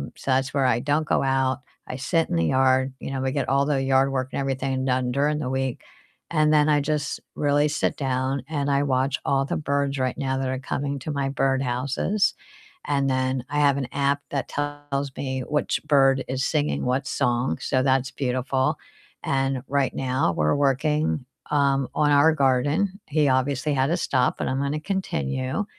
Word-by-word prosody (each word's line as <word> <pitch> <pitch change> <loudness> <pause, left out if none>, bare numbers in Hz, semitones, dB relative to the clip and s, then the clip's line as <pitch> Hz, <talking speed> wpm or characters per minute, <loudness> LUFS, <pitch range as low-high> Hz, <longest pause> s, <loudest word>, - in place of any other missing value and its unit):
so 135 - -3
that's 130 +1 +1
where 135 -2 +2
I 125 - +3
don't 145 +4 0
go - - +2
out, 135 -1 +1 0.3
I 130 - -5
sit 165 +4 0
in - - -1
the 85 - +2
yard, 130 0 +2
you - - -6
know, 135 -1 -3
we 130 0 0
get 140 -1 -1
all 140 +1 +3
the 140 -2 +1
yard 135 0 +3
work 130 -1 -2
and - - -2
everything 135 -1 -1
done 125 -1 0
during 145 +3 +1
the 125 - -3
week, 130 -2 -2 0.5
and 155 -1 +3
then 150 0 +4
I 145 -1 +3
just 150 0 -2 0.2
really 145 0 +2
sit 150 - 0
down, 130 0 -1
and 145 -2 -1
I 140 +1 +2
watch 135 0 +1
all 135 0 +2
the - - -2
birds 140 -2 -1
right 130 -1 -1
now 135 -2 -1
that 135 -1 -1
are 130 0 -2
coming 140 +1 -3
to 155 - -5
my 140 -1 -1
birdhouses, 135 - 0 0.5
and 140 -1 +1
then 130 -1 0
I 150 - -1
have 140 -1 +4
an 130 -3 -2
app 140 0 +1
that 140 -2 -2
tells 145 -1 -3
me 130 -1 -3
which 150 +3 -1
bird 135 -3 +4
is 130 +1 -2
singing 150 -1 0
what 130 +4 0
song, 125 -1 0
so 130 0 0
that's 130 -1 +1
beautiful, 130 0 -1 0.5
and 135 -1 0
right 140 -1 +1
now 130 -9 0
we're 75 - +1
working, 145 +1 +1 0.3
um, 140 -3 +2
on 150 -1 +3
our 145 +3 +5
garden. 145 +8 +1
He 150 -1 +2
obviously 135 +2 +1
had 135 0 +2
to 170 +4 +1
stop, 130 -6 +1
but - - -2
I'm 130 +1 -1
gonna 140 +2 -1
continue. 130 - -2
135 Hz, 195 wpm, -24 LUFS, 130-145 Hz, 0.5 s, our